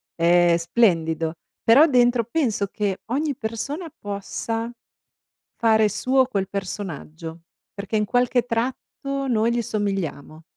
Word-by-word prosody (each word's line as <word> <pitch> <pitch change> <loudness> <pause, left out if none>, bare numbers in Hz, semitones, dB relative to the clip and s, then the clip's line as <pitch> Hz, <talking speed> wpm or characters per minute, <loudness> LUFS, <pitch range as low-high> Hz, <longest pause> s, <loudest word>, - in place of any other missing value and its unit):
è 175 0 +4
splendido. 165 -4 +1 0.3
Però 255 +7 +7
dentro 245 -3 +3
penso 235 -5 0
che 200 -1 -2
ogni 290 +2 0
persona 280 +8 -4
possa 225 +3 -4 0.9
fare 220 -2 +4
suo 260 +4 +2
quel 195 -6 -2
personaggio 170 -4 -6 0.3
perché, 200 +1 -3
in 210 - +2
qualche 245 +2 +2
tratto, 265 +3 -3
noi 230 -1 +2
gli 240 0 0
somigliamo. 195 -8 -3
220 Hz, 115 wpm, -23 LUFS, 185-245 Hz, 0.9 s, Però